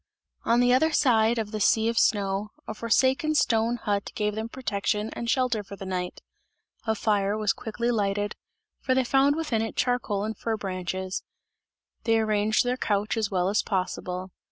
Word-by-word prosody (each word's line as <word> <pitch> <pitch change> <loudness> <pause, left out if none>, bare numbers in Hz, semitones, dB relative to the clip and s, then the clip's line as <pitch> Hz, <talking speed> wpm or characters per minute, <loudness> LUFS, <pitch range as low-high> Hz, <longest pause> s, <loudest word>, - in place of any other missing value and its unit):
On 235 +1 +4
the 245 0 +4
other 315 +5 +3
side 235 -5 +3
of 215 -2 -2
the 215 - -3
sea 220 +2 +3
of 230 0 +2
snow, 200 0 +1 0.2
a - - -3
forsaken 260 +7 +2
stone 230 -4 +2
hut 205 -3 -2
gave 210 0 0
them 220 +2 -4
protection 210 -3 -2
and 235 - -4
shelter 250 -3 +1
for 200 - -9
the 195 - -8
night; 180 -1 -4 0.7
a 220 - +2
fire 205 -1 +1
was 210 -2 +1
quickly 235 +2 -2
lighted, 205 -2 -1 0.4
for 260 - 0
they 260 - +3
found 270 +3 +3
within 300 -9 -1
it 225 - -3
charcoal 235 -5 0
and 220 +1 -4
fir 225 -1 -1
branches; 185 -1 -3 0.8
they 225 -1 +3
arranged 215 0 +2
their 250 +1 -1
couch 205 -2 0
as 220 -3 0
well 180 -2 +1
as 205 +2 +2
possible. 185 -1 -3
220 Hz, 180 wpm, -26 LUFS, 200-235 Hz, 0.8 s, On